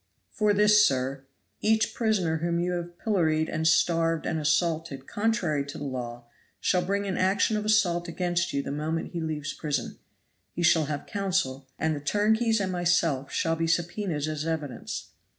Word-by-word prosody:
"For 210 -1 +2
this, 210 +1 +5
sir. 135 -4 0 0.3
Each 220 0 +2
prisoner 195 -8 +1
whom 170 +1 -1
you 175 +1 0
have 175 -1 -4
pilloried 160 -7 +1
and 160 +1 0
starved 165 0 +2
and 160 - -1
assaulted 150 -2 0
contrary 190 -9 0
to 145 - -7
law 120 -4 -5 0.3
shall 180 - +2
bring 200 +2 -1
an 190 -2 -2
action 195 +3 +2
of 210 0 -2
assault 180 -5 +2
against 175 0 -1
you 140 0 -1
the - - -4
moment 155 +3 -3
he 170 - -4
leaves 155 -2 -3
prison. 145 -6 -3 0.5
He 175 - -3
shall 160 -2 +4
have 145 0 -4
counsel, 185 -10 -1
and 160 0 0
the - - -4
turnkeys 220 +8 +2
and 190 -2 -1
myself 170 -6 +1
shall 165 0 0
be 165 0 -1
subpoenaed 170 -2 -1
as 155 -1 -3
evidence. 155 -6 -4
165 Hz, 170 wpm, -27 LUFS, 150-195 Hz, 0.5 s, this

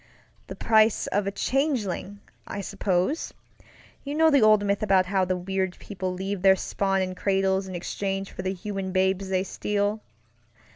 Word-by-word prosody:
The - - -7
price 220 -1 +3
of 200 0 -1
a - - 0
changeling, 210 - -1 0.3
I 200 - -4
supposeŌĆöyou 195 - -1 0.8
know 320 0 +5
the 280 - +5
old 215 -1 +5
myth 200 0 0
about 190 -3 +3
how 190 0 +1
the 185 0 -1
weird 190 0 -2
people 185 -2 -5
leave 190 +1 -4
their 190 0 +6
spawn 195 0 0
in 185 0 -3
cradles 190 0 0
in 185 - -6
exchange 195 +2 -3
for - - -6
the 190 0 -1
human 195 0 -4
babes 190 0 +1
they 185 -1 +1
steal. 205 +2 -1
195 Hz, 160 wpm, -26 LUFS, 190-205 Hz, 0.8 s, their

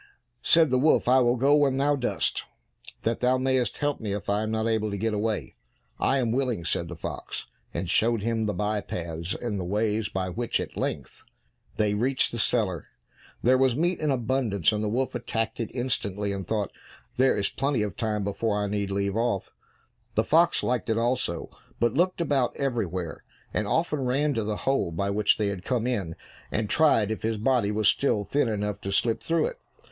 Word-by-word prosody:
Said 165 -4 +5
the 130 - +3
wolf, 155 -1 +3
"I 130 +1 +6
will 120 -1 +3
go 135 +4 +4
when 140 -3 +3
thou 145 +1 +3
dost, 130 -3 -1 0.6
that 115 0 0
thou 125 +1 +3
mayest 130 -3 0
help 145 -1 -1
me 105 -3 -3
if 100 0 -3
I 105 +1 +1
am 110 - -2
not 110 0 0
able 110 -1 +1
to 100 - -3
get 110 +2 -1
away." 105 +1 -2 0.5
"I 135 - +2
am 120 -4 +1
willing," 125 -8 -1
said 85 +1 0
the 85 - -7
fox, 80 - -5 0.3
and 95 - -3
showed 115 +4 +2
him 115 -1 0
the 105 - -1
by 105 +2 0
paths 85 -1 -4
and 105 -5 -3
ways 105 +1 0
by 95 -1 -2
which 115 +6 -1
at - - -5
length - - -4 0.5
they 105 -1 +1
reached 130 +6 +1
the 120 - -4
cellar. 105 -7 0 0.6
There 130 +2 +4
was 130 -2 +3
meat 175 +5 +1
in 155 - 0
abundance, 120 - +1
and 105 0 -1
the 105 - 0
wolf 130 +4 -1
attacked 115 -2 -2
it 115 - -2
instantly 105 -5 -2
and 95 -3 -4
thought, 105 -4 -1 0.5
"There 130 +1 +4
is 100 -1 +1
plenty 135 -4 0
of 105 - -4
time 105 -3 -1
before 105 +2 -1
I 105 - 0
need 100 -1 -2
leave 100 0 -1
off!" 115 -3 -1 0.6
The 110 - +3
fox 165 +8 +3
liked 125 -1 -1
it 110 - +2
also, 120 -7 -1 0.3
but 120 -1 +2
looked 175 +3 +1
about 140 -6 +1
everywhere, 95 - -2 0.3
and 110 - 0
often 155 +4 +1
ran 140 +4 +1
to 115 -3 -1
the 105 0 -2
hole 135 -10 +1
by 100 +4 -1
which 105 +1 +3
they 105 -2 0
had 95 -3 -5
come 120 -1 0
in, 100 -10 -2 0.4
and 105 -1 -1
tried 115 -10 +4
if 110 - -3
his 110 0 -1
body 115 -1 +2
was 105 0 +1
still 110 -7 +2
thin 140 +3 +1
enough 105 -1 -2
to 100 - -4
slip 115 +3 +1
through 165 0 +1
it. - - -4
115 Hz, 205 wpm, -26 LUFS, 105-130 Hz, 0.6 s, I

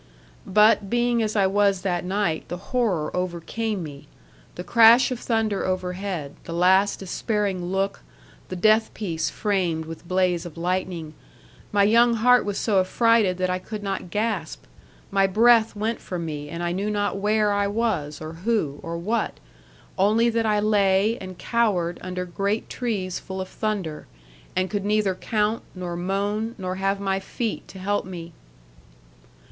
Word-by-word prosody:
'But, 210 0 +4
being 240 0 +2
as 215 -1 -1
I 200 -2 +4
was 200 -1 +2
that 175 -3 -1
night, 185 -3 -1
the 175 - -5
horror 195 -6 -1
overcame 185 +3 -2
me. 145 -3 -9 0.5
The 180 - -6
crash 230 +7 +6
of 250 - -3
thunder 225 -4 0
overhead, 185 -4 -3
the 165 - -6
last 190 +4 +4
despairing 195 -1 -2
look, 195 +2 -1 0.5
the 185 - -4
death 215 +4 +3
piece 170 -7 -2
framed 180 -6 -1
with 165 +1 -9
blaze 180 -2 +1
of 175 -2 -9
lightning 175 -2 -2 0.6
my 205 -1 +4
young 235 +3 +5
heart 250 +2 +4
was 205 -1 -2
so 205 -4 +2
affrighted 210 0 +3
that 185 0 0
I 185 - -1
could 210 +2 -7
not 195 -2 -3
gasp. 205 - -2 0.5
My 195 0 +3
breath 225 +3 +4
went 220 +2 -2
from 175 -2 -5
me, 150 -2 -5
and 170 +2 -5
I 175 - 0
knew 195 +4 -2
not 205 -1 -1
where 210 +1 +2
I 200 0 +1
was, 200 -9 -1
or 155 +1 -7
who, 170 -5 -1
or 165 0 -5
what. 215 +6 -2 0.6
Only 220 +4 +4
that 225 -1 0
I 210 -1 +2
lay, 205 +1 +2
and 185 -1 -8
cowered, 195 -8 0
under 180 0 -4
great 200 +4 -2
trees 200 -7 -2
full 190 0 -7
of 185 0 -4
thunder; 200 -8 -3 0.5
and 185 +1 +1
could 205 0 -3
neither 210 -1 +1
count, 215 +3 -1
nor 180 -1 -4
moan, 200 +5 -2
nor 185 -2 -4
have 195 +1 0
my 195 -1 0
feet 225 +3 -4
to - - -12
help 205 +2 -1
me. 170 -2 -8
195 Hz, 165 wpm, -24 LUFS, 180-215 Hz, 0.6 s, crash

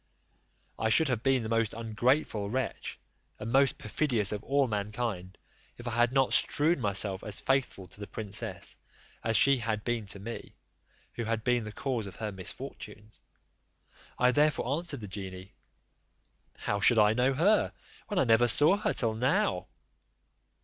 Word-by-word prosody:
I 110 - +1
should 150 +7 +4
have 125 -4 0
been 130 -1 +2
the - - -3
most 115 -1 0
ungrateful 115 -1 0
wretch, 130 +4 -3 0.4
and 105 - -6
the 115 - -4
most 135 0 +4
perfidious 110 -2 0
of 105 -1 -4
all 140 0 +2
mankind, 105 -3 -3 0.4
if 120 - -9
I - - -1
had 120 +1 +2
not 135 -1 +2
strewn 150 0 +2
myself 100 -2 0
as 105 -1 0
faithful 135 -8 0
to - - -14
the 105 - -6
princess 105 -2 -5 0.5
as 115 0 +2
she 140 -1 +5
had 110 -3 -2
been 120 -3 -2
to 100 - -6
me, 115 +4 -8 0.6
who 120 - -4
had 110 -1 -2
been 120 -1 +1
the 105 - -6
cause 120 -2 -3
of 95 - -10
her 110 -2 -4
misfortunes. 100 +2 -7 1.0
I 125 0 +4
therefore 145 -1 +2
answered 165 -7 -4
the 105 - -6
genie, 95 -1 -8 1.0
"How 105 - -2
should 115 +3 +4
I 105 0 +5
know 125 +3 +2
her, 200 +9 +3 0.4
when 205 - -3
I - - +4
never 120 0 +4
saw 150 - +4
her 210 - 0
till 115 -3 +1
now?" 110 -6 +1
115 Hz, 165 wpm, -30 LUFS, 105-130 Hz, 1.0 s, she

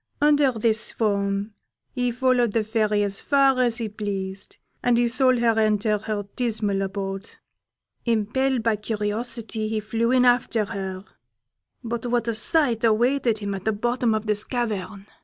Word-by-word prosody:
Under 290 -2 +4
this 220 -1 0
form 200 -1 -1 0.4
he 245 -2 -1
followed 245 -2 +1
the 225 - +1
Fairy 215 -1 +1
as 200 -1 -3
far 275 -2 +3
as 240 -2 +1
he 230 -3 -2
pleased, 200 -2 -5 0.2
and 245 -1 +2
he 240 0 +3
saw 255 +2 +3
her 230 -2 +2
enter 215 -1 +2
her 215 -1 -3
dismal 215 -5 -1
abode. 195 +1 -4 0.8
Impelled 235 +3 0
by 225 -2 +1
curiosity, 220 +1 -2
he 215 0 -1
flew 225 +2 -1
in 250 0 +4
after 240 -3 +2
her; 195 -2 -6 0.8
but 235 0 -4
what 240 -1 0
a 230 - 0
sight 235 +1 +2
awaited 235 +1 +2
him 205 -1 -4
at 190 -1 -6
the 220 - +1
bottom 240 +1 0
of 215 0 -3
this 210 -1 0
cavern! 215 -5 -4
220 Hz, 160 wpm, -24 LUFS, 210-240 Hz, 0.8 s, Under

